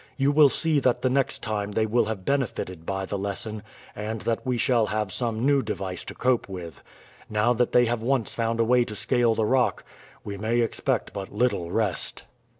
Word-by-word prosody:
You 140 0 +3
will 145 -1 +6
see 155 +1 +1
that 125 -2 +1
the 130 - +2
next 135 -1 0
time 105 -2 -2
they 110 +1 +2
will 115 +1 +2
have 105 -4 -5
benefited 95 - -2
by 95 0 -2
the 100 +1 -3
lesson, 100 +2 -4 0.3
and 110 +2 -4
that 115 +4 -1
we 125 -2 -1
shall 115 -2 +2
have 105 -1 -2
some 115 -1 -1
new 140 -1 +4
device 95 -5 -4
to - - -7
cope 125 -4 +1
with. 85 -5 -8 0.5
Now 110 +3 +2
that 120 0 +1
they 125 - +5
have 120 -1 -1
once 125 -1 0
found 115 0 -1
a - - +5
way 125 +1 +4
to 110 -2 -7
scale 120 0 +2
the 110 - +1
rock 125 +2 +1 0.4
we 100 -1 -6
may 115 +3 +1
expect 115 - -1
but 100 -1 -6
little 105 -6 0
rest." 100 -1 -1
115 Hz, 205 wpm, -26 LUFS, 105-125 Hz, 0.5 s, will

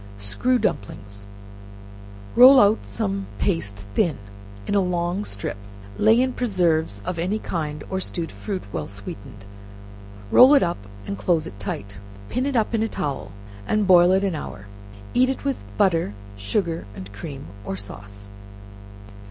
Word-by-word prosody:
Screw 105 - +1
Dumplings. 100 - -3 1.1
Roll 260 +2 +10
out 205 - +4
some 100 -1 -2
paste 100 - -1
thin, 155 - +1 0.5
in - - -2
a 200 - +4
long 180 +1 0
strip, 100 - -4 0.4
lay 220 +2 +5
in 255 0 +1
preserves 170 - +1
of 170 - -3
any 185 +6 0
kind, 150 -7 -4
or 190 - -2
stewed 170 -3 -4
fruit, 200 -3 -5
well - - -3
sweetened, 100 0 -8 0.9
roll 265 +4 +8
it 275 - +5
up 100 - -3 0.2
and 100 0 -5
close 160 +7 +1
it 100 - -9
tight, 100 0 -5 0.3
pin 255 +3 -1
it 280 - -2
up 225 0 +1
in 225 - +1
a 225 - +1
towel, 135 -9 -4 0.4
and 215 -1 +2
boil 180 -1 +7
it 190 +1 +3
an 195 -3 0
hour, 105 -10 -6 0.5
eat 255 +1 +4
it 265 - -3
with 275 -1 -1
butter, 165 - +2 0.2
sugar 165 - -2
and 95 +1 -9
cream, 140 +6 -7 0.2
or 95 -2 -4
sauce. 100 0 -10
165 Hz, 150 wpm, -23 LUFS, -, 1.1 s, Roll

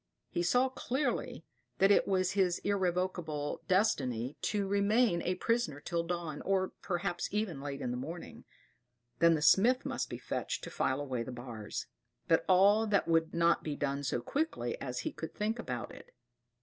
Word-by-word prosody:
He 175 - 0
saw 245 +9 +3
clearly 260 +2 -2 0.3
that 195 +1 +5
it - - +4
was 185 -1 +2
his 190 -3 +2
irrevocable 180 -6 -1
destiny 135 - +1
to 205 -2 0
remain 200 -1 +3
a 180 +2 0
prisoner 230 -7 0
till 170 +3 -1
dawn, 170 -3 -4
or, 190 -1 +1
perhaps, 175 -1 -2
even 200 -9 -2
late 140 0 -5
in 120 - -2
the 125 - -2
morning; 165 +7 -7 0.8
then 170 0 +6
the 150 - -2
smith 245 - +5
must - - -2
be - - -5
fetched - - -3
to - - -6
file 130 +2 0
away 130 -4 -2
the 115 - -5
bars; 120 -4 -6 0.4
but 165 - +4
all 200 +4 +5
that 200 -4 +2
would 165 -1 +2
not 170 0 +3
be 150 -2 -3
done 140 0 -2
so 125 -3 -1
quickly 270 - -2
as 125 -2 -3
he - - -3
could 160 - -7
think 220 +3 -1
about 125 - -4
it. - - -13
175 Hz, 175 wpm, -32 LUFS, 145-200 Hz, 0.8 s, then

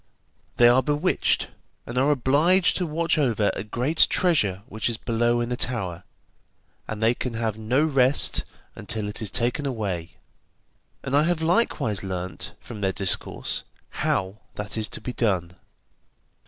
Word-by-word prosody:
They 120 - +7
are 125 +2 +5
bewitched, 150 +6 0 0.4
and 120 - -7
are 130 +3 +3
obliged 150 +7 +3
to 180 - -1
watch 165 +1 0
over 115 -7 +2
a - - -4
great 125 +9 +2
treasure 105 - +1
which 110 +3 -2
is 115 - -2
below 120 +1 +1
in 120 - -2
the 125 - -1
tower, 95 -9 -2 0.9
and 110 0 -4
they 115 +2 +4
can 120 -1 -4
have 110 -2 -1
no 115 +6 +1
rest 135 -2 +4 0.3
until 110 -2 -4
it 105 - -6
is 110 - -2
taken 125 +7 0
away, 95 -9 -4 0.9
and 135 0 -1
I 145 - +5
have 170 -2 0
likewise 160 - +1
learnt, 95 -1 -5
from 105 -3 -9
their 95 -1 +1
discourse, 95 -1 0 0.4
how 95 +3 -1 0.2
that 105 0 -4
is 110 -1 0
to - - -7
be 125 - -5
done. 90 -7 -1
120 Hz, 155 wpm, -24 LUFS, 105-140 Hz, 0.9 s, They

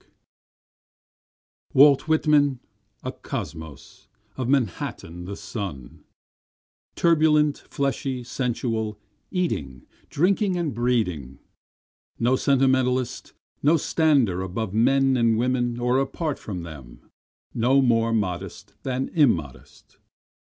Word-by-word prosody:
24 - - 0
Walt 145 +1 +6
Whitman, 150 -4 +3 0.4
a - - -3
kosmos, 80 -4 -8 0.3
of 130 -2 -3
Manhattan 90 -8 -2
the 100 +2 -6
son, 90 - -7 0.9
Turbulent, 150 -3 +3
fleshy, 135 -2 -2
sensual, 115 -3 -2 0.3
eating, 70 - -3 0.2
drinking 190 +4 +1
and 165 -6 -2
breeding, 105 - -1 0.8
No 120 +2 +2
sentimentalist, 130 -2 +1 0.3
no 155 +4 +4
stander 140 - +2
above 95 +2 -4
men 135 +4 +3
and 115 -2 +2
women 120 0 0
or 125 +2 +2
apart 145 +2 -2
from 90 -5 -6
them, 70 -8 -12 0.4
No 125 +4 +3
more 115 -3 +2
modest 100 -1 -3
than 130 +2 -2
immodest. 90 - -1
125 Hz, 95 wpm, -24 LUFS, 100-140 Hz, 0.9 s, Walt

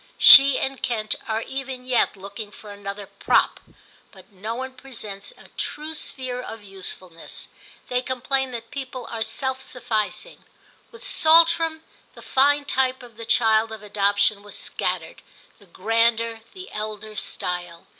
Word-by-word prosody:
She 275 -1 +10
and 270 0 -2
Kent 220 -3 -1
are 220 +1 -1
even 265 -1 -6
yet 250 -4 +1
looking 200 +2 -8
for 210 0 -12
another 200 0 -7
prop, 200 +1 +1 0.5
but 190 -1 -17
no 210 +4 -5
one 260 +1 -5
presents 225 -6 -7
a - - -17
true 305 +2 -5
sphere 255 -5 -3
of 225 -3 -9
usefulness. 185 -3 -6 0.4
They 250 0 0
complain 260 +1 -1
that 230 -1 -8
people 260 -3 -6
are 230 - -4
self 260 +4 -1
sufficing. 240 - -3 0.5
With 465 0 -14
Saltram 330 -3 +4 0.3
the - - -12
fine 285 +2 +3
type 260 -2 0
of 240 -2 -14
the 230 +1 -8
child 225 -1 +3
of 220 -1 -8
adoption 205 0 +1
was 205 0 -8
scattered, - - -2 0.4
the 200 - -19
grander, 225 +4 +1
the 375 0 -10
elder 215 0 -6
style. 175 -3 -2
230 Hz, 145 wpm, -23 LUFS, 205-265 Hz, 0.5 s, She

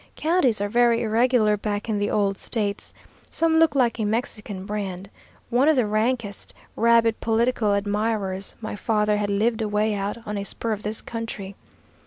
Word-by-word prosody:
Counties 315 - +2
are 205 - -1
very 235 +1 +3
irregular 225 -1 +3
back 205 +1 -3
in 215 -2 -1
the 205 - 0
old 200 -2 +1
States. 205 0 -3 0.4
Some 325 -1 +2
look 320 -2 +4
like 240 -3 +2
a - - 0
Mexican 210 -3 -2
brand. 195 -2 -5 0.4
One 255 +5 +4
of 315 - +4
the 250 -4 +2
rankest, 215 0 -2 0.2
rabid 230 -1 +3
political 225 -1 +1
admirers 205 -2 0
my 215 -1 -5
father 210 -1 +1
had 205 -1 -1
lived 220 +3 +1
away 210 0 0
out 200 +2 -3
on 210 -1 -3
a - - -3
spur 225 +3 -4
of 210 -1 -2
this 215 +1 -3
county. 215 -4 -6
215 Hz, 170 wpm, -24 LUFS, 205-235 Hz, 0.4 s, look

